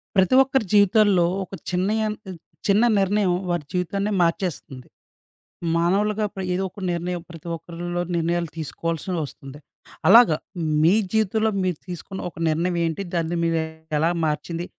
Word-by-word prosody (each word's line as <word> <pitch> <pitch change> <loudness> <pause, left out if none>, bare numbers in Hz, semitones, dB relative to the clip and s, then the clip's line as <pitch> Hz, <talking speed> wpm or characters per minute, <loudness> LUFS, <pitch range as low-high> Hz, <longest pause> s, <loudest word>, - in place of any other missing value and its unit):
ప్రతి 190 +6 +4
ఒక్కరి 265 -3 0
జీవితాల్లో 205 -2 +5 0.2
ఒక 190 - -13 0.2
చిన్నయన్ 210 +4 0 0.5
చిన్న 205 +3 +4 0.2
నిర్ణయం 195 -1 +2 0.2
వారి 175 -4 -1
జీవితాన్నే 195 +3 -1
మార్చేస్తుంది. 165 -6 -2 0.9
మానవులుగా 205 +5 +1
ప్ర 190 - -5
ఏదో 185 +2 -1
ఒక 195 - -12
నిర్ణయం 175 0 -3
ప్రతి 165 0 -11
ఒక్కరిలో 175 +1 -5
నిర్ణయాలు 170 0 0
తీసుకోవాల్సి 165 +2 -4 0.2
వస్తుంది. 140 0 -11 0.5
అలాగా 230 -7 +8 0.5
మీ 170 +4 +6 0.2
జీవితంలో 220 0 +1
మీరు 180 -4 -1
తీసుకున్న 180 +2 -7
ఒక - - -22
నిర్ణయం 170 +3 0
ఏంటి? 165 +3 -2
దాన్ని 170 0 -1
మీరు 165 0 +1 0.4
ఎలా 160 +3 +2 0.2
మార్చింది? 165 +3 -2
180 Hz, 130 wpm, -23 LUFS, 165-200 Hz, 0.9 s, అలాగా